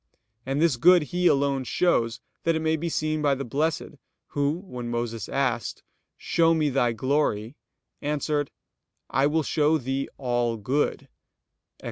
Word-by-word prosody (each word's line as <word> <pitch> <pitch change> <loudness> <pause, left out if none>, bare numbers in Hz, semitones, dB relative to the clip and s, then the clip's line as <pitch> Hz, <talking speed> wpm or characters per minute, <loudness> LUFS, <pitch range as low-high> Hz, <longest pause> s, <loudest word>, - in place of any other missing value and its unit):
And 135 +2 0
this 160 -5 +3
good 175 +5 +6
He 180 0 +3
alone 140 -2 +2
shows, 120 -6 +1 0.2
that 165 -1 +2
it 160 - -1
may 160 0 +2
be 170 +2 -3
seen 155 -1 -1
by 145 -2 +3
the 135 +1 -5
blessed, 150 +3 -2 0.3
Who, 145 0 0
when 125 -8 -6
Moses 120 -2 -3
asked: 130 -4 -1 0.3
"Show 165 -1 +2
me 155 -3 +1
Thy 125 -3 +2
glory," 115 -2 0 0.5
answered: 145 -1 -1 0.6
"I 135 +3 +3
will 155 +1 +1
show 150 +2 +2
thee 135 0 -3
all 120 -3 0
good" 130 +8 0
(Ex. - - -45
140 Hz, 150 wpm, -26 LUFS, 125-155 Hz, 0.6 s, good